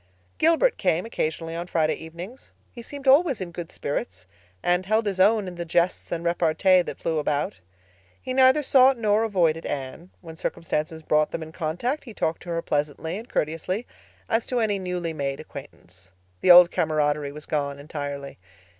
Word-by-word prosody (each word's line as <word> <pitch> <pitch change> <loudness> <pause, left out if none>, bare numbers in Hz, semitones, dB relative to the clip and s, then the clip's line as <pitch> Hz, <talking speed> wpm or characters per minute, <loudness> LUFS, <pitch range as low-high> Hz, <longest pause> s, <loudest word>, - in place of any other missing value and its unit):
Gilbert 335 +10 +3
came 180 -1 +1
occasionally 165 -6 -3
on 170 +1 -4
Friday 160 -3 +1
evenings. 170 +10 -10 0.2
He 240 - -10
seemed 280 +3 -9
always 280 0 +5
in 180 -2 -5
good 170 -1 -7
spirits, 95 -9 -4 0.4
and 180 +1 +1
held 220 +2 +2
his 195 -2 -2
own 205 +1 +4
in 180 - -6
the 170 - -3
jests 170 +2 0
and 170 -1 -3
repartee 175 +2 +3
that - - -6
flew 160 -1 -1
about. 145 -8 -1 0.6
He 255 - -5
neither 260 +3 +5
sought 260 -1 +5
nor 215 -1 +2
avoided 170 -7 +1
Anne. 140 +5 -5
When 165 -3 -10
circumstances 160 -1 -3
brought 150 0 +2
them 165 - -5
in 160 - -10
contact 180 - -3
he 230 -4 -10
talked 160 +1 -1
to 175 - -10
her 165 0 -2
pleasantly 150 +3 -2
and 230 - -12
courteously, 165 +8 -2 0.4
as 225 0 0
to 250 - 0
any 210 -3 +1
newly 180 -3 -3
made 140 -2 -3
acquaintance. 95 - -12 0.3
The 180 - +1
old 175 0 +9
camaraderie 150 -2 0
was 150 +1 -10
gone 140 -2 -2
entirely. 140 - -6
170 Hz, 175 wpm, -25 LUFS, 155-210 Hz, 0.6 s, old